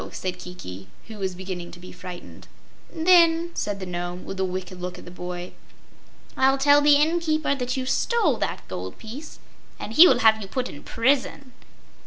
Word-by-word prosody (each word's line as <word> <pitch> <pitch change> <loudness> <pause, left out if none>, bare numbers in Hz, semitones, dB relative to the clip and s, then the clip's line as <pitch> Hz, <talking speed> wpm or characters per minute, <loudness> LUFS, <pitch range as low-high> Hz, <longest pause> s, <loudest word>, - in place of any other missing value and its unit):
said 185 -1 -4
Kiki, 95 - -9 0.2
who 220 -2 -10
was 190 -2 -2
beginning 180 -2 -6
to 175 - -11
be 180 - -11
frightened. 180 -1 -10 0.4
"Then," 335 0 +4
said 205 -8 -3
the 190 - -5
Nome, 175 0 -5
with 195 - -6
a - - +1
wicked 185 -1 -5
look 180 0 -5
at - - -12
the 175 - -10
boy, 180 0 -6 0.8
"I'll 270 +1 +3
tell 285 +1 +5
the 290 0 +6
inn 315 +4 +3
keeper 310 -3 0
that 255 -1 -3
you 260 - -2
stole 340 - +1
that - - -3
gold 90 0 -6
piece 250 +8 -9 0.4
and 220 - -7
he 325 +9 +9
will - - +3
have 220 0 +6
you 195 - -6
put 255 +5 -2
in 145 - -10
prison." 260 +1 0
220 Hz, 190 wpm, -24 LUFS, 180-285 Hz, 0.8 s, he